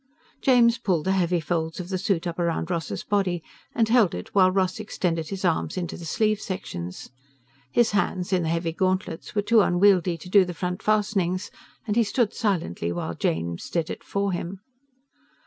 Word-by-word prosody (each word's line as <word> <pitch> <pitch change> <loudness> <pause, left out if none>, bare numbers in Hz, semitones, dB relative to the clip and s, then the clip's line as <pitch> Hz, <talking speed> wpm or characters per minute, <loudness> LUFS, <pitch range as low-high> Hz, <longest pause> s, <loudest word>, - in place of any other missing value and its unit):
James 245 -2 +4
pulled 180 -9 0
the 190 - +2
heavy 180 -2 +2
folds 160 0 -2
of 180 0 -6
the 190 -1 -1
suit 185 -3 0
up 170 0 -4
around 170 0 -1
Ross's 170 -2 -3
body 185 -5 0 0.3
and 225 -1 +3
held 225 -5 +4
it 90 - -8
while 185 -2 +6
Ross 185 +1 0
extended 170 -6 -2
his 195 -1 -4
arms 170 +2 0
into 175 -3 -3
the 170 - -9
sleeve 215 +5 +1
sections. 90 - -6 0.6
His 240 -2 +3
hands, 190 -2 0
in 180 - +3
the 160 - -1
heavy 165 0 0
gauntlets, 185 -1 -2
were 205 - +1
too 225 +1 +5
unwieldy 180 -2 +3
to 165 - -11
do 195 +1 +6
the 180 -1 -5
front 180 +1 -3
fastenings, 205 -3 0 0.3
and 210 -2 -1
he 235 - +4
stood 220 +1 0
silently 170 - -1
while 85 -1 -3
James 85 +1 -2
did 165 -2 -1
it - - -7
for 200 0 -1
him. 185 +2 -4
185 Hz, 185 wpm, -25 LUFS, 170-205 Hz, 0.6 s, while